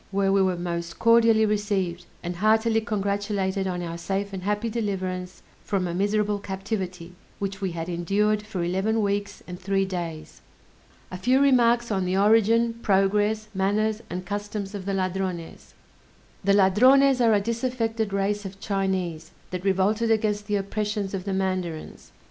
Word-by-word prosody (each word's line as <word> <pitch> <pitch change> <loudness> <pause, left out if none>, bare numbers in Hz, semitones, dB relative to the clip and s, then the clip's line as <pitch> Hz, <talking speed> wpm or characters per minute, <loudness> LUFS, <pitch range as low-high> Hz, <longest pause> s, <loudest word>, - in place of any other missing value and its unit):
where 195 0 +1
we 195 - +4
were 185 -2 +1
most 170 -1 -4
cordially 230 -1 +5
received, 195 -4 -1 0.2
and 175 0 -4
heartily 220 +3 +3
congratulated 200 -2 -1
on 180 -1 -3
our 170 0 -5
safe 195 +3 -3
and 190 - -4
happy 210 +4 -1
deliverance 190 -5 -3 0.2
from 190 -3 -1
a 170 - -3
miserable 205 +2 0
captivity, 190 -3 -5 0.2
which 195 0 -4
we 190 -3 -2
had 165 0 -4
endured 200 +5 +1
for 210 -4 -4
eleven 195 +5 0
weeks 200 0 -2
and 180 0 -7
three 195 0 0
days. 170 -4 -6 0.7
A 185 - -6
few 255 +7 +3
Remarks 240 -4 +3
on 190 -2 0
the 185 +1 0
Origin, 225 +3 +3
Progress, 210 +2 +2
Manners, 210 +3 0
and 180 +1 -5
Customs 205 +1 -4
of 200 -2 -6
the 195 - 0
Ladrones 185 -2 -4 0.7
The 200 +1 +3
Ladrones 255 +7 +5
are 225 -2 +5
a - - +3
disaffected 230 -1 -2
race 200 +1 0
of 195 0 -8
Chinese, 190 -5 -2 0.2
that 180 -1 -4
revolted 200 +4 +1
against 210 -2 +1
the 210 - 0
oppressions 205 0 -2
of 190 -1 -4
the 195 - -2
mandarins. 185 -4 -3
200 Hz, 155 wpm, -25 LUFS, 185-215 Hz, 0.7 s, cordially